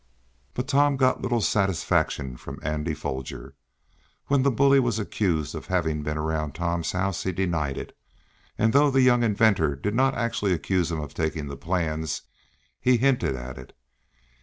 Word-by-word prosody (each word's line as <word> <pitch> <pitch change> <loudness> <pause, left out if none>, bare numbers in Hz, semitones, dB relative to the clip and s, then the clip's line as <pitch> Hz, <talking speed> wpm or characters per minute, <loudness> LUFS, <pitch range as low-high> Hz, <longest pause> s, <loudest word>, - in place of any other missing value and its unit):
But 125 +1 -3
Tom 140 0 +3
got 130 -1 +2
little 120 -2 0
satisfaction 90 - 0
from - - -9
Andy 75 +2 -2
Foger. 65 -1 -6 0.8
When 140 -1 +3
that 140 - +3
bully 140 +2 +4
was 120 -3 +1
accused 90 -7 -1
of - - -7
having 80 -4 0
been 75 +1 -3
around 75 -2 -2
Tom's 85 0 -2
house 95 0 -1
he 95 - -1
denied 85 -6 -1
it, - - -7 0.6
and 110 +1 +2
though 145 +1 +5
the 135 -1 +3
young 120 -1 +5
inventor 105 -9 +3
did 105 +10 -3
not 135 +3 +2
actually 115 -5 0
accuse 90 0 0
him 80 - -2
of 75 -2 -6
taking 80 -2 -2
the 70 - -5
plans, 80 -2 -2 0.6
he 125 -1 +3
hinted 125 - +2
at 65 0 -7
it. 65 - -14
90 Hz, 165 wpm, -25 LUFS, 75-120 Hz, 0.8 s, though